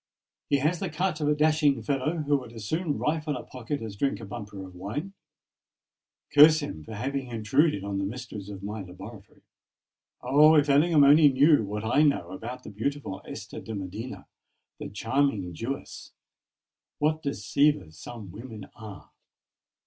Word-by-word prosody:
He 140 - +4
has 155 +5 0
the 190 - -2
cut 165 0 -1
of 150 - +1
a 150 - +3
dashing 150 -2 +3
fellow 150 +3 -1
who 145 0 +2
would 125 -4 -9
as 110 -2 -8
soon 160 - -1
rifle 150 -2 -1
a - - -7
pocket 130 +2 -5
as 110 -3 -6
drink 135 +7 -1
a 115 - -8
bumper 100 -2 -7
of 95 - -12
wine. 110 - -5 1.2
Curse 155 +2 +8
him, 110 - -6
for 110 - -8
having 135 +4 -3
intruded 120 - +1
on 100 -1 -3
the - - -1
mysteries 105 -2 -6
of 100 -1 -8
my 105 +2 -4
laboratory! 95 +3 -12 0.8
Oh! 155 +3 +6
if 145 -1 +4
Ellingham 150 +2 +5
only 145 +2 +7
knew 140 0 +5
what 105 +1 -4
I 125 +6 +3
know 140 - +2
about 120 +6 -7
the - - -9
beautiful 110 -2 -3
Esther - - -8
de 110 - -6
Medina—the 100 +6 -9
charming 115 -4 0
Jewess! 125 +10 -6 0.8
What 155 +1 +1
deceivers 140 - +1
some 110 -6 -9
women 110 -1 -9
are! 105 -3 -11
130 Hz, 160 wpm, -27 LUFS, 105-150 Hz, 1.2 s, Curse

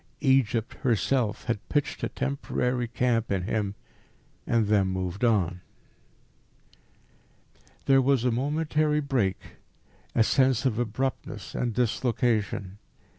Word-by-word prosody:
Egypt 125 -5 +2
herself 120 - +1
had 115 -4 -3
pitched 145 -1 -1
a - - -1
temporary 125 -2 -2
camp 115 -2 0
in 95 -2 0
him, 100 0 -2 0.7
and 115 -2 +2
then 100 -2 +3
moved 95 +2 -3
on. 95 -6 +2 2.2
There 135 -1 +5
was 130 -2 +2
a 125 - +3
momentary 150 +4 +1
break, 125 -10 0 0.8
a 115 - +5
sense 130 +1 +2
of 120 -3 +1
abruptness 120 +3 -3
and 120 - -1
dislocation. 110 -5 0
120 Hz, 110 wpm, -27 LUFS, 105-135 Hz, 2.2 s, There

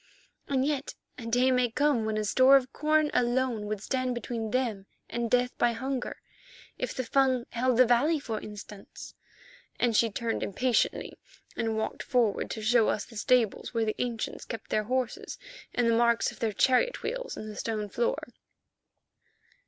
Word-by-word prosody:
And 265 -1 +1
yet 285 -2 -2 0.2
a 230 - -7
day 250 +3 +3
may 250 -1 +2
come 275 -2 +1
when 220 0 -1
a 215 - 0
store 260 +6 +6
of 260 -2 +2
corn 305 0 +2
alone 240 -3 +1
would 210 -1 -4
stand 255 0 -1
between 230 -2 -4
them 225 -5 -1 0.2
and 235 -1 -2
death 250 +1 +2
by 240 -1 +3
hunger—if 260 +2 -6
the 255 - -3
Fung 260 0 +2
held 245 0 +1
the 255 - +7
valley, 275 +7 +3
for 225 -6 -4
instance," 210 -1 -10 0.7
and 240 -2 +2
she 230 +2 +4
turned 225 +2 -2
impatiently 245 +5 0 0.4
and 225 -1 -1
walked 220 - -3
forward 235 -6 +1
to 220 - -5
show 225 0 +4
us 205 - -1
the 230 - -15
stables 235 0 +1
where 225 -1 +2
the 215 - -2
ancients 235 -3 -3
kept 225 - -8
their 215 - +1
horses 260 - -2 0.3
and 240 -1 +1
the 230 - +3
marks 235 0 +3
of - - -15
their 225 -2 0
chariot 260 - +2
wheels - - -4
in 215 - -6
the 215 - -7
stone 215 -1 -3
floor. 485 - -2
240 Hz, 170 wpm, -28 LUFS, 220-260 Hz, 0.7 s, the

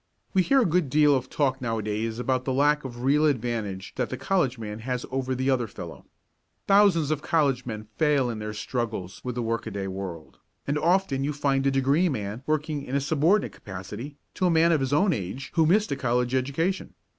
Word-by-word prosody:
We 190 - +4
hear 270 +8 +4
a - - 0
good 170 -3 +1
deal 150 +1 +5
of 130 -1 -2
talk 135 -2 0
nowadays 110 -1 -2
about 130 +1 0
the 130 - -1
lack 145 +2 +3
of 120 -2 -7
real 150 +3 +4
advantage 115 -8 -2
that 125 -2 -1
the 130 - -4
college 155 -9 0
man 105 -1 -6
has 125 +1 -3
over 130 0 -1
the 130 +2 +1
other 125 -3 +1
fellow. 90 -5 -10 0.6
Thousands 195 -7 +4
of 150 -2 -1
college 140 -7 +1
men 110 -2 -4
fail 145 -4 +3
in 115 -3 -4
their 105 0 -5
struggles 110 -5 -4
with 125 -1 -4
the 120 - -2
work 115 0 -2
a - - -2
day 100 -2 -4
world, 95 -4 -7 0.3
and 145 +1 0
often 170 -5 +2
you 145 +2 -1
find 140 -1 +1
a - - +5
degree 135 +6 +2
man 105 -3 -4
working 155 -1 -1
in 135 0 -4
a - - +3
subordinate 160 +8 +2
capacity 105 +9 -8 0.2
to 185 - +1
a - - +3
man 165 0 +4
of 160 - +3
his 135 -1 -1
own 180 +6 +3
age 105 +6 -5
who 160 -2 +3
missed 205 +5 +3
a - - +1
college 125 -1 0
education. 140 +9 -1
135 Hz, 215 wpm, -26 LUFS, 115-150 Hz, 0.6 s, deal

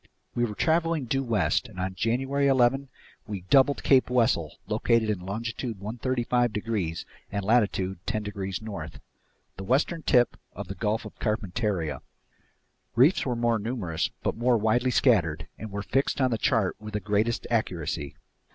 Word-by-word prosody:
We 120 - +1
were 105 -3 -5
traveling 165 -1 +1
due 135 +3 0
west 105 - +1
and 100 -5 -11
on 95 +1 -2
January 135 +8 0
11 135 +1 +3 0.4
we 100 -3 -4
doubled 135 +8 +3
Cape 130 -2 +4
Wessel, 115 - +1
located 115 -2 +2
in 100 - -2
longitude 110 +3 -4
135 120 +2 0
degrees 105 -6 -2 0.3
and 100 -1 -2
latitude 100 -5 +1
10 110 -2 -1
degrees 100 -1 -4
north, 110 -2 -7 0.6
the 95 - -6
western 140 - +1
tip 125 -4 +3 0.2
of - - -7
the - - -3
Gulf 105 +4 -1
of - - -11
Carpentaria. 100 - -1 0.9
Reefs 135 +6 +4
were 125 - 0
still 115 -1 +2
numerous 100 -8 -2
but - - 0
more 120 +1 +3
widely 110 +4 +2
scattered 125 - +2
and 110 - -6
were 100 0 -4
fixed 135 +4 0
on 130 -2 +2
the 115 - 0
chart 115 -9 +1
with 105 0 -8
the - - +1
greatest 105 +3 0
accuracy. 85 - -2
115 Hz, 160 wpm, -27 LUFS, 100-125 Hz, 0.9 s, Cape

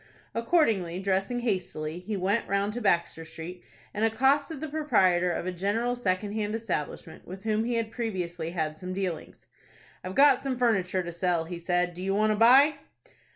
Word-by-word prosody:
Accordingly, 225 - +1
dressing 195 +5 -1
hastily, 175 -7 -2
he 205 +3 -4
went 200 +5 0
round 200 +1 0
to 245 - -4
Baxter 170 -5 +1
Street, 165 +2 -9 0.3
and 210 - -2
accosted 270 +6 +2
the 315 - -4
proprietor 185 - +2
of 170 - -3
a 185 - -1
general 205 +7 -1
second 205 -3 -1
hand 215 0 -2
establishment, 210 -10 -5
with 190 +2 -9
whom 220 0 0
he 240 0 -1
had 225 -1 -2
previously 185 -8 -3
had 155 -3 -3
some 185 0 -5
dealings. 185 -4 -5 0.6
"I've 185 +1 -6
got 280 -2 +6
some 265 -2 -2
furniture 190 -7 +1
to 175 - -5
sell," 175 -1 0
he 170 +1 -6
said. 175 +1 0
"Do 175 - -8
you 195 +1 0
want 215 +1 +3
to - - +2
buy?" 265 +7 +6
195 Hz, 180 wpm, -27 LUFS, 180-230 Hz, 0.6 s, got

